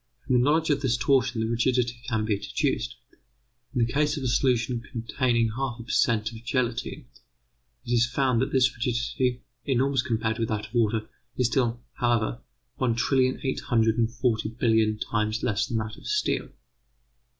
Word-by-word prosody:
From -, -, 0 dB
the 125 Hz, -, +5 dB
knowledge 155 Hz, +3 st, +2 dB
of 145 Hz, -1 st, +1 dB
this 125 Hz, -3 st, +1 dB
torsion 125 Hz, 0 st, +2 dB
the 110 Hz, -, 0 dB
rigidity 120 Hz, +1 st, 0 dB
can 110 Hz, -3 st, 0 dB
be 110 Hz, -2 st, +1 dB
deduced. -, -, -1 dB, 0.8 s
In 120 Hz, -, +3 dB
the 120 Hz, -, -5 dB
case 150 Hz, +1 st, +1 dB
of 140 Hz, -, -4 dB
a -, -, 0 dB
solution 120 Hz, -1 st, +1 dB
containing 115 Hz, -1 st, 0 dB
1/2 125 Hz, -3 st, -3 dB
per -, -, -6 dB
cent. 110 Hz, -3 st, +2 dB
of 115 Hz, 0 st, -11 dB
gelatine, 125 Hz, +3 st, -2 dB, 0.8 s
it -, -, -5 dB
is 120 Hz, 0 st, +4 dB
found 130 Hz, -2 st, +1 dB
that 135 Hz, +2 st, -1 dB
this 130 Hz, -1 st, +3 dB
rigidity, 120 Hz, +1 st, -1 dB, 0.2 s
enormous 135 Hz, 0 st, +1 dB
compared 110 Hz, -1 st, -1 dB
with 115 Hz, -, 0 dB
that 105 Hz, -1 st, -2 dB
of -, -, -15 dB
water, 110 Hz, -2 st, +1 dB, 0.3 s
is 125 Hz, -, +2 dB
still, 120 Hz, -1 st, +1 dB
however, 115 Hz, -, 0 dB, 0.4 s
one 120 Hz, -3 st, +1 dB
trillion 130 Hz, +1 st, +2 dB
eight 130 Hz, -, -1 dB
hundred 115 Hz, -2 st, +1 dB
and 115 Hz, -1 st, +2 dB
forty 120 Hz, -3 st, 0 dB
billion 110 Hz, -2 st, +2 dB
times 110 Hz, +1 st, -1 dB
less 115 Hz, +2 st, 0 dB
than 120 Hz, -4 st, -1 dB
that 110 Hz, 0 st, -3 dB
of -, -, -11 dB
steel. 425 Hz, 0 st, 0 dB
120 Hz, 175 wpm, -26 LUFS, 115-130 Hz, 0.8 s, the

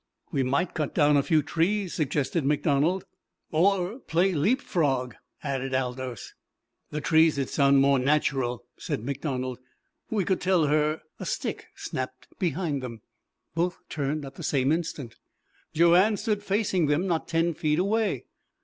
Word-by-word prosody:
"We 135 Hz, -, +1 dB
might 140 Hz, +7 st, 0 dB
cut 155 Hz, -4 st, -3 dB
down 150 Hz, -2 st, +4 dB
a 140 Hz, -, +5 dB
few 155 Hz, 0 st, +2 dB
trees," 180 Hz, +5 st, 0 dB
suggested 150 Hz, +1 st, 0 dB
MacDonald. 150 Hz, +5 st, +1 dB, 0.5 s
"Or 190 Hz, -, +2 dB
play 185 Hz, -2 st, +1 dB
leap 195 Hz, -, +2 dB
frog," 135 Hz, -, 0 dB, 0.3 s
added 135 Hz, -2 st, -2 dB
Aldous. 125 Hz, -3 st, -3 dB, 0.6 s
"The 150 Hz, -, -4 dB
trees'd 160 Hz, -3 st, +3 dB
sound 140 Hz, -1 st, +4 dB
more 140 Hz, -1 st, +4 dB
natcherel," 130 Hz, -3 st, +1 dB, 0.2 s
said 105 Hz, -, -3 dB
MacDonald. 130 Hz, -2 st, -3 dB, 0.5 s
"We 205 Hz, -5 st, 0 dB
could 190 Hz, -, 0 dB
tell 180 Hz, -4 st, +3 dB
her 150 Hz, +1 st, +1 dB
" -, -, -47 dB
A -, -, -5 dB
stick -, -, -3 dB
snapped 130 Hz, 0 st, -5 dB
behind 165 Hz, -5 st, -1 dB
them. 115 Hz, -4 st, -7 dB, 0.5 s
Both 175 Hz, +3 st, 0 dB
turned 145 Hz, 0 st, -2 dB
at 135 Hz, -, -9 dB
the -, -, -7 dB
same 135 Hz, 0 st, +1 dB
instant. 150 Hz, -7 st, -3 dB, 0.5 s
Joanne 175 Hz, +6 st, +5 dB
stood 210 Hz, 0 st, -1 dB
facing 195 Hz, -5 st, +1 dB
them 150 Hz, +5 st, +1 dB
not 170 Hz, -4 st, -1 dB
ten 165 Hz, +1 st, +1 dB
feet 150 Hz, -1 st, 0 dB
away. 200 Hz, -, 0 dB
150 Hz, 150 wpm, -27 LUFS, 135-175 Hz, 0.6 s, a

